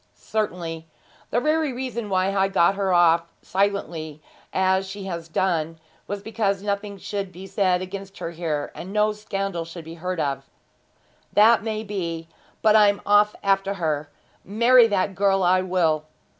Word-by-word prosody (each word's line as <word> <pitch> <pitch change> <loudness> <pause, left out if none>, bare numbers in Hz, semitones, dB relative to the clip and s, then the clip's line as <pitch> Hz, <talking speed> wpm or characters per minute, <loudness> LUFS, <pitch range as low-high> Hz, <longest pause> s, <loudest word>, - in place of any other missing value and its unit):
'Certainly. 170 -6 -3 0.4
The 240 - +1
very 305 +1 +1
reason 240 -4 -4
why 190 0 +1
I 195 0 +3
got 195 -1 +3
her 195 0 -2
to - - +2
go - - +4
off 170 -1 +4
silently, 170 -6 -2 0.3
as 190 0 +1
she 200 0 -7
has 170 -3 -5
done, 165 -2 -1 0.3
was 200 -1 -5
because 205 -3 -1
nothing 200 0 -3
should 200 0 -4
be 185 +2 -10
said 185 -2 +1
against 195 +1 -8
her 165 - -5
here, 160 -4 -3
and 185 - -8
no 210 +1 +2
scandal 195 -4 -3
should 165 0 -10
be 165 - -8
heard 180 -1 -2
of.' 135 -2 -2 0.8
'That 225 +2 +6
may 215 0 -3
be; 170 -6 -4 0.4
but 215 -1 +5
I'm 205 -1 +5
off 205 +1 +4
after 195 0 +1
her. 155 -4 -2 0.3
Marry 235 +4 +5
that 200 -2 0
girl 195 0 +2
I 185 +1 +4
will.' 170 -5 +1
195 Hz, 165 wpm, -24 LUFS, 170-205 Hz, 0.8 s, That